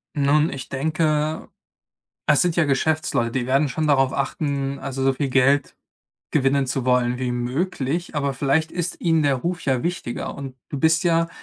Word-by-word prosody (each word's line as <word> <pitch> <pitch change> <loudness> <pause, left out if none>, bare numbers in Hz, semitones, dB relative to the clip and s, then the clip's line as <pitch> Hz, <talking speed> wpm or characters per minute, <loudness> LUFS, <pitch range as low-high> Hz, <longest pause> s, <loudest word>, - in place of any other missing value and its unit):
Nun, 150 +2 +3
ich 130 -2 -7
denke, 155 +2 -1 0.8
es 150 - +4
sind 175 -2 +1
ja 170 - +4
Geschäftsleute, 140 -4 0
die 125 -1 -1
werden 135 +3 +2
schon 155 +3 -2
darauf 135 -2 +3
achten, 140 -1 -2
also, 135 -1 -4
so 135 0 +3
viel 140 +1 -2
Geld 135 +2 +2 0.5
gewinnen 135 -1 +2
zu 130 0 -2
wollen 125 -1 +2
wie 125 -1 -2
möglich, 140 +6 -2
aber 140 -2 -1
vielleicht 145 +5 +1
ist 175 0 -4
ihnen 165 -3 +2
der 140 -2 +2
Ruf 175 +6 -3
ja 130 -3 +1
wichtiger 175 -8 -3
und 135 -2 -8
du 145 - -4
bist 160 +5 +3
ja 165 -1 +2
140 Hz, 175 wpm, -22 LUFS, 135-160 Hz, 0.8 s, es